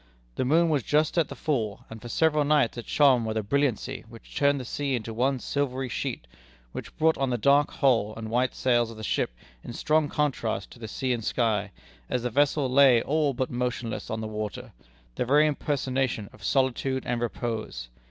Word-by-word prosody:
The 125 - -1
moon 165 +5 +4
was 150 -3 +2
just 150 +5 +1
at 160 - +2
the - - -8
full, 115 -10 -2
and 110 -1 -10
for 120 - -8
several 155 +2 +2
nights 145 -5 +2
it 120 - -7
shone 135 -5 +4
with 110 0 -2
a 110 - 0
brilliancy 135 +1 -1
which 115 -1 -14
turned 140 -1 +3
the 130 - -6
sea 140 +2 -2
into 115 -1 -5
one 130 +4 +1
silvery 135 0 -2
sheet, 90 - -4 0.5
which - - -8
brought 160 0 +3
out 135 -1 +1
the 120 - 0
dark 140 +5 +4
hull 115 -7 +1
and 110 -1 -6
white 125 +2 +1
sails 120 -2 +2
of 115 - -10
the 110 - -8
ship - - 0 0.3
in - - -7
strong 155 +3 +1
contrast 125 -10 -1
to - - -14
the 110 - -6
sea 130 +3 -1
and 115 -2 -3
sky, 105 -3 0 0.4
as 125 - -1
the 125 - -2
vessel 145 +1 +2
lay 130 -2 +5
all 150 -2 +1
but 130 +1 -2
motionless 120 -2 -3
on 110 0 -3
the 110 - -4
water, 105 -2 -5 0.4
the - - -1
very 145 +5 +4
impersonation 135 -6 -1
of - - -16
solitude 130 0 0
and 120 -1 -1
repose. 110 - -4
125 Hz, 200 wpm, -27 LUFS, 115-140 Hz, 0.5 s, lay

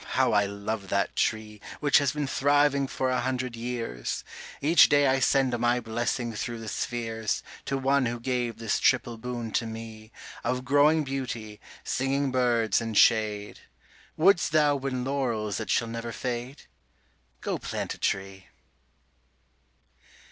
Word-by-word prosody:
how - - +3
I 100 -1 +3
love 100 0 -4
that 100 0 0
tree) 105 -1 -1 0.2
Which 145 -1 +4
has 140 -2 +1
been 150 -1 -2
thriving 140 0 +2
for 130 0 -1
a 125 - +1
hundred 125 -1 -2
years; 115 - -4 0.4
Each 160 +4 +6
day 145 0 +4
I 135 0 +3
send 130 -1 +2
my 120 +1 +2
blessing 120 +1 -2
through 120 +2 -4
the 115 -1 -8
spheres 115 -1 -2 0.2
To 135 - -1
one 135 -1 +2
who 120 +1 -3
gave 120 -2 -2
this 115 -2 -1
triple 115 -2 +2
boon 120 -1 -5
to 115 - 0
me, 110 -1 -9 0.3
Of 125 +1 -2
growing 145 +4 +4
beauty, 125 -6 -5 0.2
singing 135 +1 0
birds, 120 -5 +2
and 115 -2 -3
shade. 105 -2 +3 0.6
Wouldst 175 0 +4
thou 150 -2 +4
win 130 -2 -3
laurels 120 -6 -1
that 110 - -5
shall 115 - +2
never 115 +1 -5
fade? 125 +3 -5 0.8
Go - - -2
plant - - -4
a - - -13
tree. 95 -1 -2
120 Hz, 150 wpm, -27 LUFS, 110-135 Hz, 0.8 s, Each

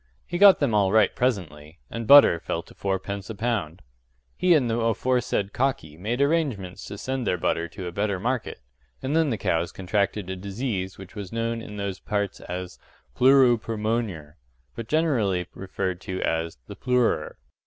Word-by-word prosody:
He 175 - -4
got 200 -1 +9
them 140 -6 0
all 100 -2 +3
right 110 -2 +4
presently 85 - -2
and 115 -1 -5
butter 140 -12 +8
fell 85 0 -3
to - - -17
fourpence 100 +1 -3
a 110 - -5
pound. 100 -8 -2 0.5
He 180 -1 +4
and 135 -6 +2
the 115 0 0
aforesaid 115 -2 0
cocky 125 - -1
made 110 - -2
arrangements 135 - -1
to 100 - -7
send 130 0 -3
their 90 - +1
butter 85 0 0
to 90 +2 -8
a 90 - -4
better 100 +1 -1
market; 125 +4 -2 0.4
and 140 +4 -1
then 160 -2 +3
the 115 - -1
cows 85 -2 0
contracted 100 +1 -1
a 95 - -4
disease 95 0 -4
which 95 -1 -11
was 100 -4 -7
known 115 0 -2
in 105 -2 -9
those 100 -2 -4
parts 100 -3 -2
as 90 0 -6 0.4
“plooro 130 -3 +5
permoanyer,” 110 -9 -3 0.4
but 115 -1 -6
generally 115 - +1
referred 95 -2 -4
to 95 0 -5
as 80 -2 -1
“th' - - -10
ploorer. 125 -2 +1
105 Hz, 175 wpm, -25 LUFS, 95-125 Hz, 0.5 s, got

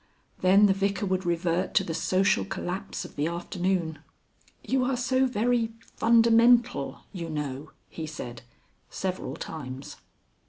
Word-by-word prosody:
Then 195 +3 +6
the 195 - +5
Vicar 200 +1 -1
would 185 -1 -1
revert 175 +1 0
to - - +5
the 165 - -4
social 185 +4 +2
collapse 190 0 -4
of - - -12
the 145 +2 0
afternoon. 175 -1 -2 0.6
"You 260 -1 +1
are 255 0 0
so 260 +1 +2
very 235 -1 +1 0.2
fundamental, 235 +1 +4
you 170 -4 -5
know," 150 -1 -4 0.2
he 160 -1 -6
said 125 -6 -7 0.5
several 185 -8 -4
times. 135 -4 -7
185 Hz, 130 wpm, -27 LUFS, 160-225 Hz, 0.6 s, Then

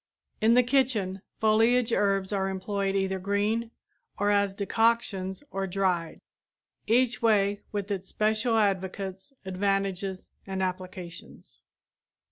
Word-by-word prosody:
In 225 +2 +5
the 250 - +6
kitchen, 240 -8 +1 0.2
foliage 225 +2 +3
herbs 195 -1 +1
are 195 -1 0
employed 195 +1 -2
either 190 -1 0
green 205 +4 0 0.5
or 205 +1 +2
as 200 -1 +2
decoctions 200 -1 0
or 195 0 -2
dried, 180 -3 -1 0.7
each 240 0 +2
way 205 -3 +3
with 205 -1 -3
its 190 -1 -3
special 220 +2 +1
advocates, 190 0 -1
advantages 195 0 -2 0.2
and 190 -1 -2
applications. 180 - -7
200 Hz, 110 wpm, -28 LUFS, 190-220 Hz, 0.7 s, the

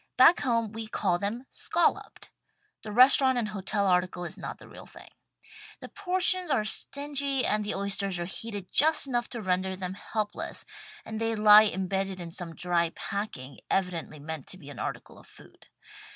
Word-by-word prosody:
Back 265 +7 +7
home 230 -4 0
we 225 0 -6
call 185 -4 0
them 225 +7 -3
"scolloped." 345 - -1 0.5
The 215 - -8
restaurant 260 +2 +6
and 225 -3 -1
hotel 200 0 -2
article 180 -1 0
is - - -5
not - - -7
the - - -15
real - - -13
thing. - - -14 0.7
The - - -10
portions 370 -2 +1
are 265 -7 +2
stingy 280 +3 -1
and 210 0 +1
the 210 - -3
oysters 195 -1 -1
are 175 - -3
heated 200 +1 -6
just 310 0 +4
enough 240 -3 -2
to 235 -3 -6
render 185 0 -1
vthem 185 0 -5
helpless 210 +1 -4 0.4
and 220 0 -6
they 225 0 0
lie 210 0 +8
embedded 190 -1 -2
in 170 -1 -7
some 165 -1 -5
dry 170 -1 0
packing, 145 -10 -5
evidently 180 -5 -2
meant 150 -1 -7
to 185 - -6
be 145 -5 -12
an 125 - -10
article - - -6
of - - -18
food. - - -18
205 Hz, 175 wpm, -28 LUFS, 180-240 Hz, 0.7 s, lie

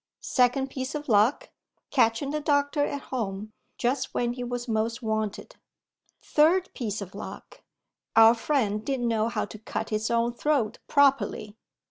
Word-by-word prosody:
Second 260 +1 +2
piece 260 +2 -4
of 300 0 -5
luck: 220 +3 +2 0.4
catching 255 +1 +2
the 300 - -1
doctor 290 0 +1
at 285 -1 -2
home, 215 -3 -3 0.2
just 255 +2 -1
when 240 0 0
he 250 0 -5
was 245 0 -4
most 230 +2 -1
wanted. 220 - -3 0.7
Third 345 +5 +3
piece 220 -5 -4
of 195 -1 -8
luck: - - -9 0.5
our 225 0 +8
friend 225 -4 0
didn't 255 -1 -1
know 225 -1 +1
how 225 -2 -2
to 210 +1 -11
cut 220 - -4
his 215 0 -1
own 235 0 +1
throat 245 -4 0
properly. 275 -7 +2
240 Hz, 150 wpm, -27 LUFS, 220-280 Hz, 0.7 s, our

